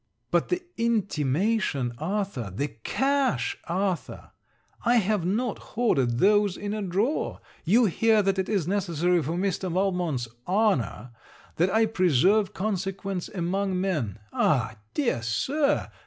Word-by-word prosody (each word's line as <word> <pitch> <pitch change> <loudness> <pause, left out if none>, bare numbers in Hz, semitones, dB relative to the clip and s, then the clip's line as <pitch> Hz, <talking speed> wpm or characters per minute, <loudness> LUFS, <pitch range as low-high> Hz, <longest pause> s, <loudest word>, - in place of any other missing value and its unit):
But - - +2
the 360 0 -1
intimation, 190 - 0
Arthur! 180 - -2
the 140 +11 -2
cash, 265 - 0
Arthur! 185 0 -2 0.5
I 240 +1 +3
have 205 -5 +1
not 220 +4 -1
hoarded 135 - 0
those 205 +2 +3
in 205 0 -4
a 215 - -3
drawer! 200 - -1 0.3
you 225 +8 +5
hear 220 +2 +3
that 195 0 +1
it 190 - -1
is 195 -7 0
necessary 180 -3 +1
for 155 +3 -3
Mr. 185 0 -1
Valmont's 180 -9 0 0.2
honor 180 - +1 0.5
that 175 +3 +3
I 220 +3 +3
preserve 190 - +3
consequence 195 -2 -3
among 190 +1 -1
men. 150 - -1 0.2
Ah! 125 -7 +1 0.2
dear 245 - 0
Sir! 280 - 0
190 Hz, 125 wpm, -26 LUFS, 165-215 Hz, 0.5 s, you